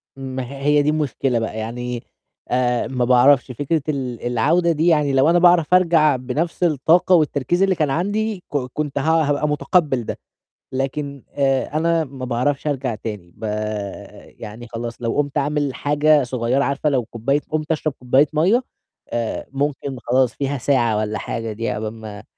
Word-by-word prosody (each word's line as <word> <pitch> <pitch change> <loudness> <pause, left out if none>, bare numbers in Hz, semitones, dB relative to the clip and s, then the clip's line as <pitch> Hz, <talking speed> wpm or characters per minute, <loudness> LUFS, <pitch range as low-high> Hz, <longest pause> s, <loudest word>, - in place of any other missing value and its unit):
ما 130 -1 -5
هي 135 +3 -8
هيَ 145 +1 +3
دي 145 - +1
المشكلة 135 -5 0
بقى، 110 -1 -4
يعني 120 +2 -4 0.5
آآ، 125 -1 +1
ما 125 -1 -1
باعرفش 125 +1 +4
فكرة 145 +5 -1
ال 130 -5 -3
العودة 155 +9 +2
دي، 160 +1 +1
يعني 150 -4 +3
لو 135 +3 +4
أنا 175 +1 +4
باعرف 175 -2 +4
أرجع 165 -5 +4
بنفس 140 +8 -3
الطاقة، 170 +3 +4
والتركيز 155 +3 +1
اللي 195 -1 +2
كان 155 -3 0
عَندي، 205 +5 -1
ك - - +2 0.2
كنت 150 -2 -3
ه - - +1
هابقى 150 -1 +2
متقّبل 150 -4 +1
ده، - - -4 0.5
لكن 140 +1 -3
آآ، 135 +1 0
أنا 165 0 +2
ما 135 -3 -7
باعرفش 130 +4 -1
أرجع 135 -5 -1
تاني، 105 -5 -7
ب - - -14 1.0
يعني 110 +3 -9
خلاص 115 +1 -6
لو 115 -1 -1
قُمت 145 0 0
أعمل 145 -1 0
حاجة 150 +1 +3
صغيرة، 125 +2 0
عارفة 140 +2 0
لو 130 -5 0
كوباية 125 +6 -1
قُمت 155 0 -2
أشرب 155 -1 -1
كوباية 130 +4 +3
مَيّة، 190 +11 +3 0.5
آآ، 115 -1 -3
ممكن 140 -1 -2
خلاص 125 +1 +1
فيها 140 0 -2
ساعة 120 -5 +1
والّا 110 0 -2
حاجة 115 -1 -4
دي 115 +2 -3
عقبال 110 +1 -3
ما 110 -2 -9
140 Hz, 170 wpm, -21 LUFS, 125-155 Hz, 1.0 s, باعرفش